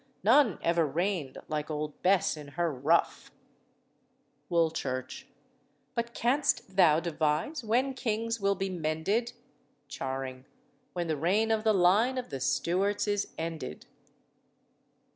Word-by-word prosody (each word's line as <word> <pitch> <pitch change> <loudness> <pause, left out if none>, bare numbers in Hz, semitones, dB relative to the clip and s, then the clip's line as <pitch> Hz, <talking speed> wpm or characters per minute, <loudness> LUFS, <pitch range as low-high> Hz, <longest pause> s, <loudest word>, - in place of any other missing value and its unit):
None 235 0 +5
ever 170 0 +3
reigned 165 -2 -2
like 155 0 -3
old 150 -1 -4
Bess 185 -2 +3
in 150 -2 -9
her 170 -3 +1
ruff. 145 +6 +1 1.2
WOOLCHURCH. 160 -7 -1 0.7
But 235 -1 -3
can'st 245 -6 0
thou 165 -5 +6
devise 165 - -1
when 250 +5 +1
kings 230 -2 -2
will 200 0 +2
be 195 0 -2
mended? 180 +8 -1 0.6
CHARING. 130 -1 -5 0.5
When 175 -1 -2
the 160 -2 -1
reign 200 +9 +2
of 220 -1 +1
the 220 -1 +4
line 205 +8 +4
of 250 - -5
the 135 - -4
Stuarts 185 +10 0
is 205 -1 0
ended." 160 - -5
175 Hz, 125 wpm, -29 LUFS, 155-220 Hz, 1.2 s, thou